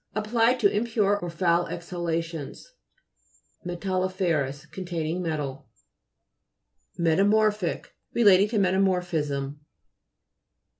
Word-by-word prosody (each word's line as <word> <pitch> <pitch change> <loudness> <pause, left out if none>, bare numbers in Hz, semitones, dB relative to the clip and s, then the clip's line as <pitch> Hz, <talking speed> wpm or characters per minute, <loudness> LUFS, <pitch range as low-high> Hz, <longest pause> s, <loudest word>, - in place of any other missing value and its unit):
Applied 230 +3 +2
to 200 -2 +3
impure 210 -2 +1
or 175 - -5
foul 170 0 +1
exhalations. 170 - -5 1.0
L] 175 - -4
'FZUOVS 175 -7 -1
Containing 175 -2 -3
metal. 150 -5 -4 1.3
METAMO'RPHIC 200 +3 +2 0.3
Relating 205 -4 +5
to 220 +1 -2
meta 190 -2 +2
morphism. 155 -7 -1
180 Hz, 85 wpm, -26 LUFS, 165-205 Hz, 1.3 s, Relating